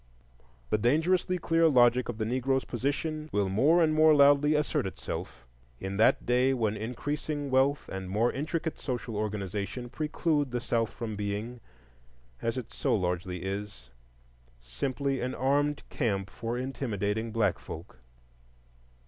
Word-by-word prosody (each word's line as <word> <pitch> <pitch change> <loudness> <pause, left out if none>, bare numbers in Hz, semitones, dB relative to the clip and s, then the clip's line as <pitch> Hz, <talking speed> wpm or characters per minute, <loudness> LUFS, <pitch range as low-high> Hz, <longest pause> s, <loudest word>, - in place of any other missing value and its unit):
The 110 - +2
dangerously 165 - +2
clear 165 -1 +3
logic 125 -3 +4
of 120 - -3
the 110 - -1
Negro's 130 +3 0
position 150 +5 -2
will 100 -2 +1
more 150 - +4
and 155 -1 +2
more 155 0 +6
loudly 145 +1 +5
assert 150 -9 0
itself 95 - -6 0.3
in 95 +1 -4
that 110 - +4
day 125 +2 +3
when 110 -4 0
increasing 145 +6 -3
wealth 135 +2 +2
and 95 -1 -6
more 110 +5 +2
intricate 160 +3 -3
social 125 -4 -4
organization 105 +3 -3
preclude 150 0 0
the 125 0 -2
South 115 -1 0
from 110 -2 -5
being, 105 +4 -4 0.8
as 115 +2 -1
it 120 -3 -6
so - - +1
largely 90 -2 -2
is, 95 -10 -5 0.7
simply 130 - -2
an 125 +1 -2
armed 145 +3 +1
camp 100 -6 -1
for 115 +1 -4
intimidating 115 -4 -2
black 115 -1 +1
folk. 80 -3 -9
120 Hz, 140 wpm, -29 LUFS, 105-145 Hz, 0.8 s, more